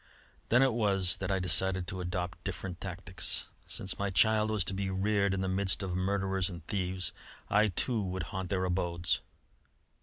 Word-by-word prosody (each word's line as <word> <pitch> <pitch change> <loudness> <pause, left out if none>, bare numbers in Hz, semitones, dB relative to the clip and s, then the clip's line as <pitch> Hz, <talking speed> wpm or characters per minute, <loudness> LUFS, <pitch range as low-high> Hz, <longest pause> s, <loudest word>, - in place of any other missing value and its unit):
Then 125 +3 +6
it 135 -3 +3
was 100 -6 +3
that 95 0 -3
I 95 - +2
decided 95 +1 +2
to 90 +1 -4
adopt 90 -1 -3
different 95 -2 -5
tactics. 95 0 -3 0.2
Since 95 - -1
my 100 0 0
child 110 +4 +3
was 110 -3 +1
to 95 - -1
be 95 0 -2
reared 100 +1 +1
in 95 0 -1
the 95 - -1
midst 95 0 +1
of 90 -2 -2
murderers 95 0 0
and 85 -3 -9
thieves, 95 -4 -1 0.4
I, 105 +1 +5
too, 110 +4 +1
would 95 -2 -3
haunt 95 -1 -3
their 95 0 0
abodes. 85 -2 0
95 Hz, 180 wpm, -31 LUFS, 90-100 Hz, 0.4 s, Then